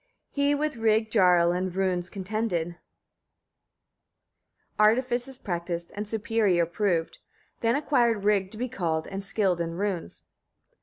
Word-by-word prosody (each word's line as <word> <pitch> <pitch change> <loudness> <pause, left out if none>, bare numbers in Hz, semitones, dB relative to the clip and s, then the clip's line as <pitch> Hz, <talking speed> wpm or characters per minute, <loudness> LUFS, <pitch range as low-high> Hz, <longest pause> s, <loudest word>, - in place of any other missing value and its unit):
42. 285 - -3
He 285 +1 +3
with 300 -2 -2
Rig 220 -1 +2
Jarl 180 -5 +5
in 185 +1 -1
runes 185 -1 -1
contended, 190 -4 -2 2.0
artifices 245 +4 +2
practised, 170 -4 -4
and 205 +1 -4
superior 215 -5 +1
proved; 170 -1 -1 0.4
then 230 +1 +2
acquired 240 -8 +2
Rig 200 -2 +2
to 215 - -11
be 250 +3 -2
called, 165 -9 -2
and 195 0 -5
skilled 195 -3 0
in 165 0 -3
runes. 190 - -3
200 Hz, 125 wpm, -27 LUFS, 175-230 Hz, 2.0 s, Jarl